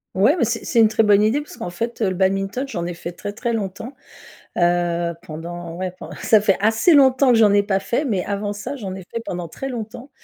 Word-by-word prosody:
Ouais, 215 - +4
mais 275 - +2
c'est 225 +1 -2
c'est 235 - +1
une 225 - +7
très 220 +1 +2
bonne 205 -1 +5
idée 220 +8 +2
parce 295 - -12
qu'en 175 - -5
fait, 230 +7 -4
heu, 210 - +3
le 185 - -1
badminton, 195 +6 0
j'en 175 -9 -3
ai 175 - -4
fait 170 +1 -7
très, 205 +4 -7
très 235 +2 -3
longtemps. 220 +3 -4 0.7
Heu, 175 -1 +1
pendant 170 +1 -7
ouais, 185 +1 -3
pend 185 - -11
ça 215 -2 +4
fait 200 -3 +2
assez 225 - +3
longtemps 265 -2 +5
que 230 - +4
j'en 210 -2 +5
ai 205 - +5
pas 195 -1 0
fait, 240 +9 -1
mais 205 -9 0
avant 205 0 -2
ça, 215 +7 -6
j'en 195 -7 -6
ai 190 - -8
fait 230 - -4
pendant 175 -4 -5
très 270 +11 -6
longtemps, 240 +2 -7
205 Hz, 245 wpm, -21 LUFS, 180-230 Hz, 0.7 s, une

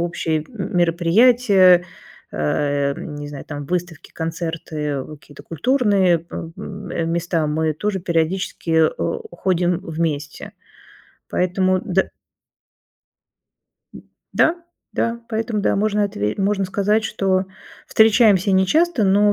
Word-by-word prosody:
общие 165 -2 -1
м 195 -5 -6
мероприятия, 185 +2 +4 0.5
а, 140 - 0
не 145 0 -7
знаю, 145 -1 -8
там 145 -1 -6
выставки 175 -2 -4
концерты 160 -4 -4 0.2
какие-то 145 - -15
культурные, 190 - +1
э, - - -6 0.2
м 190 -4 -5
места 170 -2 0
мы 155 +1 0
тоже 195 +5 -2
периодически, 170 0 -2 0.2
э, - - -3
ходим 180 -2 0
вместе 155 -4 -4 0.8
поэтому 185 +1 +1
д 190 +1 0 1.8
д - - -12 0.3
да, 320 - +3 0.4
да 230 0 -1
поэтому, 220 -1 -2
да, - - +1
можно 210 0 +1
отве 105 - -2
можно 195 0 +1
сказать, 205 +3 0
что 190 -3 0 0.4
встречаемся 215 -3 +4
нечасто, 245 - +2
но 205 +2 +4
180 Hz, 110 wpm, -20 LUFS, 160-205 Hz, 1.8 s, мероприятия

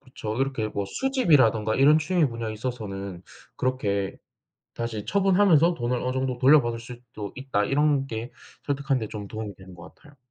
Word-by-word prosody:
그쵸 130 -5 -6
이렇게 130 -5 -1
뭐 100 -1 -3
수집이라든가 145 - +2
이런 145 +4 +6
취미 165 +1 +2
분야에 115 -2 -4
있어서는 100 -6 -5 0.3
그렇게 100 -7 -1 0.6
"다시 115 -3 -4
처분하면서 180 - +4
돈을 125 -1 -1
어느 125 - -1
정도 130 -1 -2
돌려받을 130 -3 +4
수도 120 -4 -9
있다." 130 -6 -1
이런 140 +2 +2
게 115 0 -6 0.3
설득하는데 135 -5 -1
좀 105 -2 -7
도움이 110 -2 -6
되는 95 -1 -13
것 85 - -13
같아요. 145 -2 -20
125 Hz, 380 characters per minute, -25 LUFS, 110-140 Hz, 0.6 s, 이런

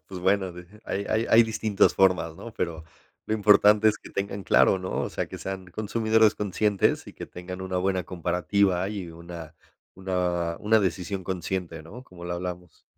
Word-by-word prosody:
Pues 95 -2 -7
bueno, 95 -1 +1
deje 90 +5 -13
hay 100 +1 -3
hay 110 +1 +1
hay 115 +1 +8
distintas 110 -2 +2
formas, 90 -4 +2
¿no?, 115 - -9
pero, 80 -2 -3 0.4
lo 110 - 0
importante 105 0 +5
es 105 - 0
que - - -13
tengan 100 0 -3
claro, 95 - +4
¿no?, 90 0 -5
o - - -3
sea, - - -3
que - - -8
sean 95 -1 -6
consumidores 110 +2 +2
conscientes 105 0 0
y - - -10
que - - -8
tengan 90 +1 -8
una 95 -1 -3
buena 95 0 0
comparativa 90 +2 0
y 100 -5 -5
una 85 -1 -10 0.4
una 90 -3 -1
una 110 +1 +3
decisión 95 +1 -2
consciente, 90 -2 -4
¿no?, 120 +11 -11
como 85 -4 -12
lo 90 - -3
hablamos. 90 -1 -7
95 Hz, 180 wpm, -26 LUFS, 90-105 Hz, 0.4 s, hay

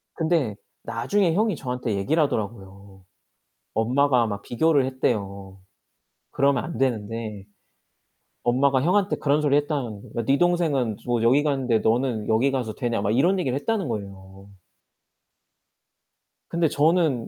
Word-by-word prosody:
근데 160 - 0 0.3
나중에 145 - 0
형이 210 +1 +1
저한테 125 -5 -3
얘기를 140 +12 +1
하더라고요. 100 -5 -5 0.7
엄마가 125 +2 +2
막 100 -1 -5
비교를 145 +2 +2
했대요. 100 -7 -3 0.7
그러면 140 -2 +2
안 170 - -6
되는데 110 -4 -2 1.0
엄마가 130 +2 +2
형한테 190 +6 +2
그런 145 +1 +1
소리 145 -2 +2
했다는 140 -8 -2
거 - - -3
"야 - - -7
네 135 +3 +3
동생은 155 - +1
뭐 120 -2 0
여기 130 +6 +4
갔는데 130 -6 +1
너는 115 -1 0
여기 115 +5 +2
가서 125 -5 -2
되냐?" 120 -5 -2
막 100 +1 0
이런 180 +9 +3
얘기를 135 -7 -1
했다는 200 +3 -1
거예요. 100 -3 -7 2.0
근데 170 -1 +1
저는 155 -4 +1
125 Hz, 290 characters per minute, -24 LUFS, 110-150 Hz, 2.0 s, 여기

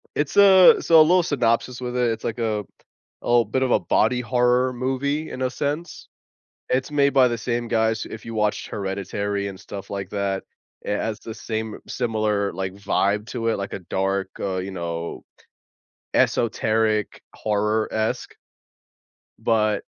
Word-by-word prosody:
It's 145 -1 -1
a 190 -2 +8
so, 165 -1 +6
a - - +10
little 175 +3 +5
synopsis 125 -3 0
with 125 0 -4
it, 125 -2 +2
it's 115 0 -5
like 115 +1 -3
a 110 -2 0 0.6
a - - -8
little 120 -1 +4
bit 120 +6 -1
of 130 - 0
a - - +4
body 125 - +2
horror 125 +1 +2
movie 135 +5 -2
in 130 - -6
a 130 - +1
sense. 145 +6 -4 0.6
It's 130 +3 0
made 140 -1 +3
by 130 -2 +5
the 120 - -2
same 120 0 -2
guys- 110 -1 +1
if 110 - -8
you 115 - -7
watched 105 -1 0
Hereditary 100 +1 -3
and 95 -1 -9
stuff 100 -1 -9
like 100 -1 -4
that- 100 -1 -2 0.4
it 105 - -1
has 110 0 -3
the 110 - -8
same 110 -1 -4
similar, 110 -4 0
like, 95 +1 -4
vibe 100 +1 0
to 115 -2 -2
it, 115 - +1
like 100 0 -5
a - - -3
dark, 95 +1 -1
uh, 95 -2 -2
you 95 +1 -4
know, 85 -2 -5 0.9
esoteric, 110 -2 +1
horror-esque 110 +1 -1 1.0
but, 110 -2 +1
110 Hz, 160 wpm, -23 LUFS, 100-125 Hz, 1.0 s, a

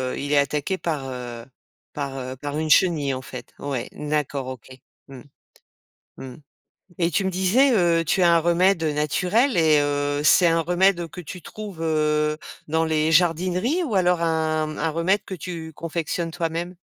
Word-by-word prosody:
heu, - - -7
il 145 +1 -2
est - - +4
attaqué 145 +6 0
par, 155 -7 -3
heu 120 -2 -7 0.5
par, 140 -2 -4
heu, 130 +1 -6
par 145 +2 -5
une 155 0 -2
chenille, 155 -6 +3
en 130 - -4
fait. - - -10
Ouais, 135 -4 -4
d'accord, 145 -3 -2
OK, 130 -3 -8 0.4
mmh. 135 -2 -11 1.0
Mmh 130 -2 -9 0.7
et 170 0 +2
tu 195 +3 0
me 190 - 0
disais, 200 +10 +3
heu 170 -4 +3
tu 180 +3 +1
as 170 -1 +5
un - - +5
remède 175 +1 +2
naturel 180 - +1
et 155 -2 +4
heu, 145 0 -1
c'est 175 +3 +5
un 165 0 +3
remède 175 0 +2
que 180 - -9
tu 175 +2 -9
trouves, 205 -1 -9
heu, 150 -1 +1 0.3
dans 160 +1 +1
les 155 0 +1
jardineries 180 - +2
ou 220 -8 -3
alors 180 -2 +2
un 155 -2 0
un 160 - 0
remède 170 +6 0
que 190 - -7
tu 165 -2 -7
confectionnes 165 +1 -3
toi-même? 170 +1 -3
160 Hz, 175 wpm, -23 LUFS, 150-180 Hz, 1.0 s, as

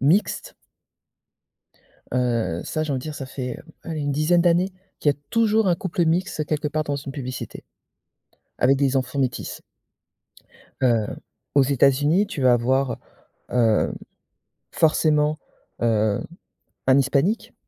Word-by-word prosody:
mixte 165 +10 +1 1.6
heu, 120 -9 0
ça, 155 - -2
j'ai 150 -2 -2
envie 130 - -1
dire, 155 +3 -6
ça 135 - -6
fait, 125 -1 -5 0.2
allez, 160 -2 -4
une 145 -1 -1
dizaine 155 +4 +3
d'années 175 +2 +2 0.3
qu'il 145 - +4
y - - -13
a - - -30
toujours 220 -2 +3
un 175 - +4
couple 175 0 -1
mixte 165 -1 0
quelque 155 0 -1
part 155 +1 -1
dans 145 -1 -2
une 135 0 -7
publicité. 130 -3 -6 0.9
Avec 135 +2 +4
des 135 -1 +1
enfants 130 +1 -2
métis. 130 -3 -2 1.2
Heu, 115 -4 +3 0.5
aux 140 - +6
États-Unis, 145 - +3
tu 145 -9 -5
vas 125 -1 +6
avoir, 130 +2 +1 0.5
heu, 115 -3 +3 0.8
forcément, 155 -1 +2 0.4
heu, 110 -3 +2 0.7
un 130 - +6
hispanique. 140 - +1
140 Hz, 130 wpm, -23 LUFS, 130-160 Hz, 1.6 s, aux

